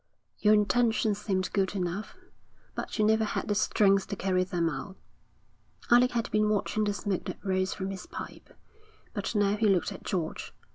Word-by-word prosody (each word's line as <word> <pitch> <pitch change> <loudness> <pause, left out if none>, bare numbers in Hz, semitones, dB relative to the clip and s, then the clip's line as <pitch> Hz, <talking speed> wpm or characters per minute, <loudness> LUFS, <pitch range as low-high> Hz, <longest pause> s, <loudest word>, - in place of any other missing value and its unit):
Your 210 0 +5
intentions 215 0 +2
seemed 185 -3 -1
good 195 -1 0
enough, 185 +2 -3 0.6
but - - -5
you 215 - +3
never 220 +1 +3
had 215 - -2
the 210 - +1
strength 195 -2 +3
to - - -4
carry 185 -1 +1
them 175 -2 -1
out.' 165 +6 -5 0.9
Alec 245 +1 +6
had 235 -1 -1
been 215 0 +2
watching 215 +1 0
the 205 - 0
smoke 200 -3 -2
that - - -5
rose 185 -1 0
from 190 0 -4
his 190 -2 -7
pipe, - - -8 0.6
but 205 +1 -3
now 205 0 +3
he 220 0 +2
looked 185 -3 +2
at - - -8
George. 175 -6 -4
200 Hz, 180 wpm, -29 LUFS, 190-215 Hz, 0.9 s, Alec